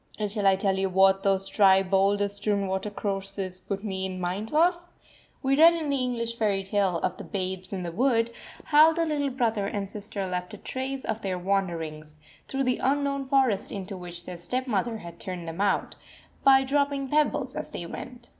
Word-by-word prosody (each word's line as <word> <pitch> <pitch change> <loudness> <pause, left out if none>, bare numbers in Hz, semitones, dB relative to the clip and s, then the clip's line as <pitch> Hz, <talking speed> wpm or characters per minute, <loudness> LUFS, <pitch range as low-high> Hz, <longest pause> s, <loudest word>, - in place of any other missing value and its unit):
And 210 -2 -2
shall 205 -2 0
I 195 - +6
tell 190 0 0
you 195 0 +1
what 190 +1 +4
those 195 -1 +1
dry, 195 -2 +5
boulder 195 +2 +2
strewn 200 0 -1
watercourses 195 -1 -3
put 195 +2 -5
me 190 -3 -3
in 185 -1 -6
mind 185 +5 -3
of? 345 +3 +3 0.6
We 270 +1 +3
read 330 +3 +7
in 310 -3 -2
the 280 - +1
English 235 -2 -2
fairy 205 -3 +1
tale 195 -2 +1
of - - -1
the - - -7
Babes 185 -1 -3
in 190 -2 -3
the 170 - -4
Wood, 230 +3 +2 0.3
how 310 +2 +6
the 335 0 0
little 290 -3 0
brother 230 -6 0
and 200 -1 -3
sister 205 0 -5
left 180 -1 -4
a - - -11
trace 265 0 -4
of 220 - -3
their 190 -3 -2
wanderings, 165 -5 -2 0.3
through 270 0 -1
the 255 -1 0
unknown 275 0 0
forest 260 -7 +2
into 195 0 -5
which 175 -1 -9
their 180 - -7
stepmother 230 +3 -1
had 170 -4 -10
turned 180 -3 -6
them 165 +4 -4
out, 200 -1 +1 0.5
by 270 -1 +6
dropping 280 0 0
pebbles 295 -3 +1
as - - -5
they 175 - -6
went. 240 +7 -9
200 Hz, 190 wpm, -27 LUFS, 190-260 Hz, 0.6 s, read